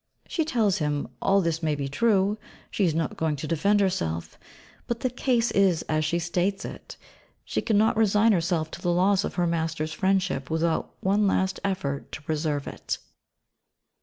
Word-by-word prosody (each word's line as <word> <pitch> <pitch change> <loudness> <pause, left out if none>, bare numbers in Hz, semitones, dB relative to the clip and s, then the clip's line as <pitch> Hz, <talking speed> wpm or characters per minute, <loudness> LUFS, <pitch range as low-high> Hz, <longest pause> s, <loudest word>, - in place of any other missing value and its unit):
She 325 - 0
tells 225 - +1
him 150 -2 -1
all 195 0 +3
this 165 -2 -1
may 155 -2 0
be 140 -1 -3
true 200 +6 +2 0.3
she 200 - +1
is 160 -3 +1
not 160 -2 -1
going 160 -2 0
to 145 - -5
defend 200 +6 +2
herself 85 - -2 0.5
but 235 -1 -3
the 255 - 0
case 245 -1 +1
is 190 -5 +3
as 155 0 0
she 160 +3 0
states 175 +3 -1
it. - - -9 0.5
She - - -1
cannot 220 -1 +2
resign 220 +1 +4
herself 165 -4 0
to - - -8
the 175 - +1
loss 190 +3 +3
of - - -4
her 175 - +1
master's 160 -2 -1
friendship 190 -6 0
without 160 +1 -1
one 200 +2 +2
last 190 0 +1
effort 180 -8 -2
to - - -6
preserve 150 -1 -1
it. - - -4
175 Hz, 175 wpm, -26 LUFS, 155-200 Hz, 0.5 s, resign